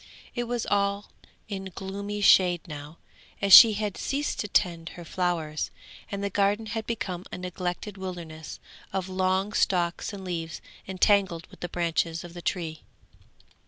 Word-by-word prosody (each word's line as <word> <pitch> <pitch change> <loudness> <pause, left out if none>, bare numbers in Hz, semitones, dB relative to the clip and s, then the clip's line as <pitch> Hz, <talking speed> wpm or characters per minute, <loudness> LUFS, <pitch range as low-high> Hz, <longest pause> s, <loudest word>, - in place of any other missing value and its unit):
It 240 -1 -2
was 240 -1 -2
all 200 0 0 0.4
in 195 -2 -5
gloomy 200 +2 -4
shade 180 -3 +5
now, 150 +1 -8 0.4
as 200 -1 +3
she 225 +1 +12
had 210 -1 -2
ceased 285 +2 -2
to 210 - -1
tend 170 -3 +1
her 175 - -8
flowers, 165 -4 -1 0.4
and 200 0 -3
the 200 - 0
garden 205 +3 +2
had 220 0 -4
become 185 -6 -3
a - - -5
neglected 180 +2 -4
wilderness 170 -4 -7 0.3
of 190 -1 -2
long 190 +2 0
stalks 175 -2 +1
and 195 -2 -8
leaves 165 -3 -4 0.3
entangled 190 -3 +2
with - - -15
the 175 - -4
branches 165 -1 -1
of 175 -1 -10
the 175 - -8
tree. 165 -3 -3
185 Hz, 155 wpm, -27 LUFS, 170-200 Hz, 0.4 s, she